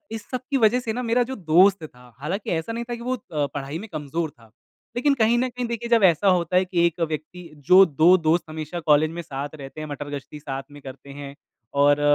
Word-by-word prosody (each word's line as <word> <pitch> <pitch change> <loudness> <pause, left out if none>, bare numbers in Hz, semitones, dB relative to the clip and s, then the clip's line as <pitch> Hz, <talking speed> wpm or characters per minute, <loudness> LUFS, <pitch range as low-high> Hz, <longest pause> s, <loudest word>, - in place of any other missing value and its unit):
इस 215 - -9
सब 255 - -3
की 275 - +2
वजह 235 +4 +5
से 230 -3 -3
ना 250 - -3
मेरा 240 +1 +2
जो 265 - -4 0.2
दोस्त 190 +1 +5
था 125 -5 -13
हालाँकि 180 +9 -4
ऐसा 165 +8 -4
नहीं 235 - -3
था 240 - -2
कि 235 - -11
वो 255 - +1
अ, 150 - -3
पढ़ाई 140 +2 -4
में 220 - -8
कमज़ोर 155 +2 -3
था। 115 -5 -22 0.4
लेक़िन 275 +3 +2
कहीं 230 +2 +4
न 255 - +1
कहीं 245 0 -4
देखिए 235 0 -4
जब 230 -4 +4
ऐसा 185 +2 +4
होता 180 -1 +1
है 185 - +3
कि 175 -2 +1
एक 170 0 -1
व्यक्ति 155 +4 -6 0.3
जो 185 +1 +9
2 165 +4 +5
दोस्त 165 +2 +3
हमेशा 155 +2 -5
कॉलेज 150 +1 +5
में 170 +1 -5
साथ 145 -1 -6
रहते 135 +3 -8
हैं, 155 - -6
मटरगश्ती 145 0 -7
साथ 135 -1 -5
में 145 0 -13
करते 135 +1 -11
हैं 140 -1 -8 0.5
और 145 0 +4
165 Hz, 235 wpm, -23 LUFS, 145-220 Hz, 0.5 s, जो